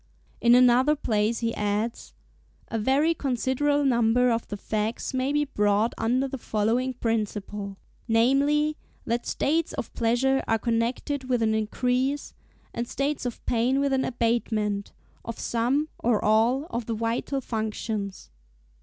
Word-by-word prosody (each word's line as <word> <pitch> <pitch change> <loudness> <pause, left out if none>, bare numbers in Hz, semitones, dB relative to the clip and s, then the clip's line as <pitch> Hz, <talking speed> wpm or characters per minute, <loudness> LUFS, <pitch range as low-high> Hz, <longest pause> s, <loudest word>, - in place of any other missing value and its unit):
In 240 0 +6
another 255 +4 +5
place 220 -4 0
he 230 0 0
adds, 210 +3 -2 0.5
"A 225 - -2
very 275 +9 +3
considerable 280 +1 0
number 245 -1 +3
of 230 0 -1
the 205 - -5
facts 215 +5 -2
may 260 +1 0
be 295 0 +1
brought 210 -3 +1
under 250 +4 +1
the 270 0 -6
following 230 +5 0
principle: 210 -3 -3 0.3
namely, 280 +6 +3 0.3
that 235 +1 -2
states 320 +3 0
of - - -5
pleasure 250 +4 +1
are 225 - +2
connected 240 +5 -1
with 245 -2 +2
an 220 0 +2
increase, 250 +6 -1 0.4
and 235 +1 -3
states 275 0 -2
of 240 - -7
pain 245 +3 +1
with 280 -1 +1
an 265 0 +2
abatement, 220 -4 -1 0.3
of 230 -1 -6
some, 250 +6 0
or 230 -3 +2
all, 230 +6 +3
of 235 -1 -3
the 230 - -1
vital 230 +5 -1
functions." 215 - -4
235 Hz, 140 wpm, -26 LUFS, 220-265 Hz, 0.5 s, In